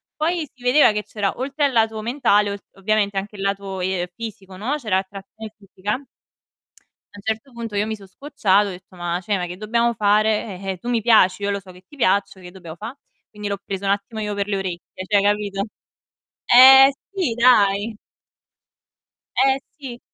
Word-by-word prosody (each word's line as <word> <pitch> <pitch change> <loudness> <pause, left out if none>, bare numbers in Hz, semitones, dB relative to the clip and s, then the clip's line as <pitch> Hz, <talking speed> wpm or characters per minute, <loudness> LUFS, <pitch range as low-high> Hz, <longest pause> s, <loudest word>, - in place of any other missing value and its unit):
Poi 320 0 -1
si 255 - -25
vedeva 250 +1 +5
che 210 0 -2
c'era, 205 -2 -2
oltre 275 +3 -2
al 275 - +1
lato 225 -2 +1
mentale, 215 -4 +2
ol 200 - -5
ovviamente 200 0 0
anche 205 +1 -4
il - - -7
lato, 195 -1 -3
ehm, 185 -1 -1
fisico, 200 -4 -8
no. 230 +10 -2
C'era 215 -9 0
attrazione 200 +3 -9
fisica. 200 +3 -4 1.1
A 205 - -12
un - - -11
certo 220 +5 -3
punto 230 -3 -6
io 205 +1 0
mi 220 - -3
so' 200 - -14
scocciata, 205 -3 +1
ho - - -4
detto: 185 0 -11
"Ma 175 0 -2
cioè, 200 +2 -1
ma 180 - -3
che 180 +1 -8
dobbiamo 235 +3 0
fare? 210 -2 +1
Eh, 195 -1 -3
eh, - - -10
tu 240 +7 -7
mi 235 -2 +1
piaci, 205 -4 +4
io 200 - -1
lo 200 0 -1
so 185 -1 -14
che 180 0 -16
ti 295 - -16
piaccio, 200 -5 +1
che 180 -1 -11
dobbiamo 175 -4 -10
fa'?" 225 +9 -8 0.4
Quindi 210 -1 -6
l'ho 200 0 -2
preso 195 0 -5
un 195 - +2
attimo 205 +3 -3
io 210 -1 -3
per 200 0 -2
le 200 -1 -1
orecchie, 185 0 -6
cioè, 205 -2 +3
capito? 205 -1 0 0.8
Eh 265 +2 +9 0.2
sì, 365 -12 -1
dai. 215 -3 +3 1.4
Eh 265 +1 +3 0.2
sì. 260 -5 -8
205 Hz, 195 wpm, -21 LUFS, 195-235 Hz, 1.4 s, Eh